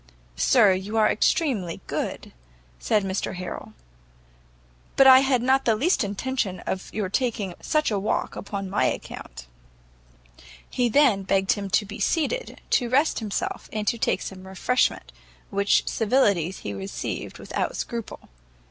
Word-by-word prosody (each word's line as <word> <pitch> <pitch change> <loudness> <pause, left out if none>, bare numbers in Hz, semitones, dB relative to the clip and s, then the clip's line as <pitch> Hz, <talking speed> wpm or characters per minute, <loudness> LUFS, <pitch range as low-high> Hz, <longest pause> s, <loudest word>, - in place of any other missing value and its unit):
"Sir, 195 - +5
you 195 +4 -3
are 215 -1 +5
extremely 215 - 0
good," - - -4 0.5
said 210 - +1
Mr 190 0 -2
Harrel, 180 0 -7 1.2
"but 270 - +6
I 260 -1 +10
had 265 -3 +2
not 265 +2 +3
the 225 - +3
least 305 - +2
intention 205 -1 -2
of 190 - -4
your 210 -3 -2
taking 210 -3 -1
such 305 -5 +1
a 205 - 0
walk 200 - -1
upon 200 -1 -5
my 195 +2 +1
account." - - -5 1.2
He 245 -1 0
then 240 -5 +4
begged 195 0 +1
him 200 -2 -2
to 205 - +2
be 205 +1 -9
seated, 485 +10 -1
to 245 -2 +2
rest 280 +6 +2
himself, 215 -3 -4
and 210 -1 -3
to 235 - -3
take - - 0
some 190 -1 -8
refreshment; 225 +7 0 0.4
which 200 0 +2
civilities 205 - +1
he 100 - -5
received 95 0 -5
without - - -3
scruple. 230 -2 -5
210 Hz, 145 wpm, -25 LUFS, 190-255 Hz, 1.2 s, I